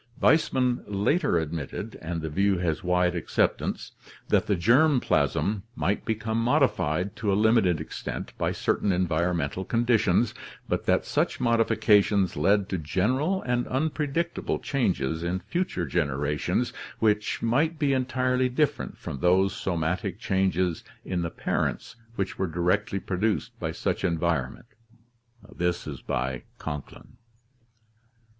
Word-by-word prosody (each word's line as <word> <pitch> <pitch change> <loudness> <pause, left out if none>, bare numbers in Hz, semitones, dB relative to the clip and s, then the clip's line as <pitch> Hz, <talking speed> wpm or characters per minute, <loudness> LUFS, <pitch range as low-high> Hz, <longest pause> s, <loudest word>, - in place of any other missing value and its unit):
Weismann 130 -6 +3
later 105 - +1
admitted, 80 -3 -4
and 80 0 -4
the 80 - -2
view 100 +3 +2
has 85 -3 -1
wide 90 0 +2
acceptance, 85 - -1 0.4
that - - +2
the 100 - +2
germ 130 - +4
plasm 105 -3 +1
might 90 +7 -1
become 110 0 -1
modified 100 -5 +1
to 105 -3 0
a - - +3
limited 110 -6 +3
extent 80 - -6
by - - +1
certain 100 - 0
environmental 85 -1 0
conditions, 115 -1 +2 0.3
but - - -2
that - - +3
such - - 0
modifications 105 -5 +3
led 100 +6 +2
to 95 - -1
general 125 - 0
and 125 -1 0
unpredictable 155 +4 -1
changes 85 - -1
in 85 +2 -1
future 175 - -2
generations 75 -1 -1 0.2
which 105 -1 +1
might 150 +8 +2
be 145 -2 +2
entirely 130 0 +1
different 140 +3 -1
from 70 - -6
those 95 +5 +3
somatic 85 -1 -2
changes 95 -3 0 0.2
in 90 -2 -2
the 85 - -2
parents 115 - -2 0.2
which 95 -3 -3
were 95 - +1
directly 90 +4 0
produced 95 - -1
by - - -2
such - - -2
environment 85 -7 -1 1.9
(Conklin). 75 - -8
95 Hz, 120 wpm, -26 LUFS, 85-120 Hz, 1.9 s, germ